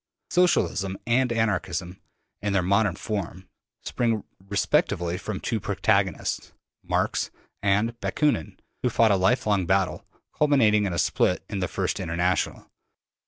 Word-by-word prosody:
Socialism 100 - +2
and 125 +1 +2
Anarchism, 95 -5 -1 0.4
in 105 -1 -1
their 95 -2 +2
modern 100 0 +2
form, 95 -4 -5 0.4
spring 115 -4 0 0.3
respectively 95 -3 +1
from 100 +1 -5
two 115 - -2
protagonists, - - 0 0.3
Marx - - 0 0.3
and 105 +4 +1
Bakunin, 145 - 0 0.2
who 125 - +1
fought 115 -1 +4
a - - +5
lifelong 95 0 +2
battle, 95 0 +1 0.3
culminating 110 -9 +3
in 95 - -3
a - - -2
split 90 +2 +1
in 100 - -3
the 90 - 0
first - - -2
International. 85 +2 -1
100 Hz, 125 wpm, -25 LUFS, 90-115 Hz, 0.4 s, a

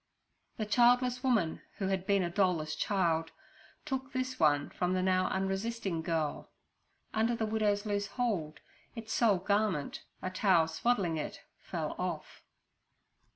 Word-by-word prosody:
The 215 - -1
childless 245 +3 +3
woman, 220 -11 +1 0.2
who 195 - -2
had 190 -1 -1
been 200 -2 +3
a 175 - -1
doll 185 -1 +3
less 155 -1 -4
child, 165 -2 +1 0.6
took 265 0 -3
this 255 0 -2
one 145 -2 +3
from 180 0 -1
the 185 - +1
now 185 0 +2
unresisting 195 -1 -2
girl. 160 -2 -2 0.6
Under 225 +2 +2
the 225 -1 -1
widow's 215 -1 +1
loose 205 -1 -1
hold 200 -10 -2 0.3
its 225 -1 -5
sole 220 -5 +4
garment, 195 -5 0 0.2
a 185 - -2
towel 185 -4 +3
swaddling 175 -1 0
it, 150 - -5 0.2
fell - - -4
off. - - -4
195 Hz, 145 wpm, -32 LUFS, 170-225 Hz, 0.6 s, sole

